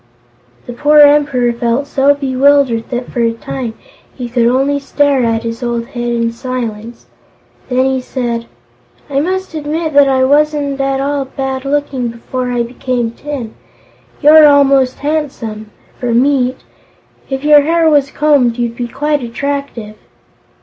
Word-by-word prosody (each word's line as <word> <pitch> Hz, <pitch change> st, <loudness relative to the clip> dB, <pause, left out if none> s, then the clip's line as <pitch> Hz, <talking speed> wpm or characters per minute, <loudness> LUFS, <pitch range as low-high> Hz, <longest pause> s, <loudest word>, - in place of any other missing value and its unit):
The 245 Hz, -, -7 dB
poor 295 Hz, +5 st, +2 dB
Emperor 285 Hz, -5 st, +3 dB
felt 235 Hz, +3 st, -1 dB
so 280 Hz, 0 st, +2 dB
bewildered 270 Hz, -3 st, +2 dB
that 245 Hz, -1 st, -4 dB
for -, -, -4 dB
a 230 Hz, -1 st, +1 dB
time 230 Hz, 0 st, -6 dB, 0.4 s
he 245 Hz, -2 st, -6 dB
could 235 Hz, -1 st, +1 dB
only 270 Hz, +3 st, +1 dB
stare 280 Hz, -1 st, +1 dB
at 225 Hz, -1 st, 0 dB
his 230 Hz, +1 st, -5 dB
old 235 Hz, -1 st, -2 dB
Head 240 Hz, -1 st, -4 dB
in 230 Hz, -1 st, 0 dB
silence. 235 Hz, -2 st, -6 dB, 0.6 s
Then 255 Hz, +1 st, +1 dB
he 265 Hz, -1 st, 0 dB
said: 235 Hz, -2 st, -4 dB, 0.6 s
"I 275 Hz, -, +1 dB
must 375 Hz, +4 st, -2 dB
admit 310 Hz, +1 st, -3 dB
that 285 Hz, 0 st, +5 dB
I 260 Hz, -1 st, +2 dB
wasn't 290 Hz, 0 st, +1 dB
at 270 Hz, 0 st, -1 dB
all 280 Hz, 0 st, -1 dB
bad 265 Hz, 0 st, -4 dB
looking 275 Hz, -3 st, -1 dB
before 250 Hz, +2 st, -5 dB
I 240 Hz, -1 st, 0 dB
became 240 Hz, -1 st, -3 dB
tin. 255 Hz, -3 st, -7 dB, 0.7 s
You're 305 Hz, +1 st, +8 dB
almost 275 Hz, -2 st, +3 dB
handsome 265 Hz, -8 st, -4 dB, 0.3 s
for 240 Hz, -2 st, -1 dB
meat. 255 Hz, 0 st, +2 dB, 0.7 s
If 270 Hz, 0 st, -4 dB
your 295 Hz, -1 st, +6 dB
hair 330 Hz, +2 st, +2 dB
was 290 Hz, -3 st, +3 dB
combed, 280 Hz, -7 st, +2 dB
you'd 235 Hz, -1 st, -2 dB
be 240 Hz, 0 st, -4 dB
quite 295 Hz, +4 st, -1 dB
attractive." 240 Hz, -3 st, -5 dB
265 Hz, 150 wpm, -14 LUFS, 240-285 Hz, 0.7 s, You're